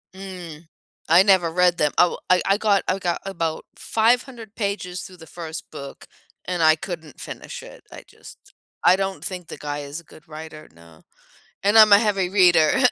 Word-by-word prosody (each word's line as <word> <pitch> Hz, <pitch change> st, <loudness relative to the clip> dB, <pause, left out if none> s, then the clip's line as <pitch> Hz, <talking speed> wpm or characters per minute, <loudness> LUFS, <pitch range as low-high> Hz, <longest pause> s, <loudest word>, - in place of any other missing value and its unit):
Mm. 180 Hz, -5 st, -10 dB, 0.4 s
I 170 Hz, +3 st, +7 dB
never 190 Hz, -4 st, +3 dB
read 180 Hz, 0 st, +2 dB
them 150 Hz, -1 st, +1 dB
oh, 175 Hz, -, +3 dB
I 180 Hz, 0 st, +4 dB
I 195 Hz, +1 st, +2 dB
got 205 Hz, -2 st, +2 dB
I 190 Hz, +1 st, 0 dB
got 175 Hz, -2 st, -2 dB
about 165 Hz, -5 st, -3 dB
500 230 Hz, -1 st, -1 dB
pages 200 Hz, -4 st, -3 dB
through 185 Hz, -1 st, -11 dB
the 160 Hz, -, -14 dB
first 160 Hz, -1 st, -8 dB
book, 140 Hz, 0 st, -10 dB, 0.4 s
and 180 Hz, -1 st, -3 dB
I 155 Hz, -1 st, +6 dB
couldn't 160 Hz, -3 st, -8 dB
finish -, -, -8 dB
it. -, -, -14 dB
I -, -, -11 dB
just -, -, -17 dB, 0.3 s
I 185 Hz, -, +6 dB
don't 195 Hz, 0 st, -4 dB
think 180 Hz, -3 st, -6 dB
the -, -, -9 dB
guy 145 Hz, 0 st, -5 dB
is 145 Hz, +3 st, -7 dB
a -, -, -16 dB
good 155 Hz, 0 st, -18 dB
writer, 155 Hz, 0 st, -10 dB
no. 85 Hz, -1 st, -19 dB, 0.6 s
And 205 Hz, +3 st, +4 dB
I'm 215 Hz, -1 st, +8 dB
a 200 Hz, -, +9 dB
heavy 200 Hz, -4 st, 0 dB
reader. 180 Hz, -2 st, +4 dB
180 Hz, 185 wpm, -22 LUFS, 160-195 Hz, 0.6 s, a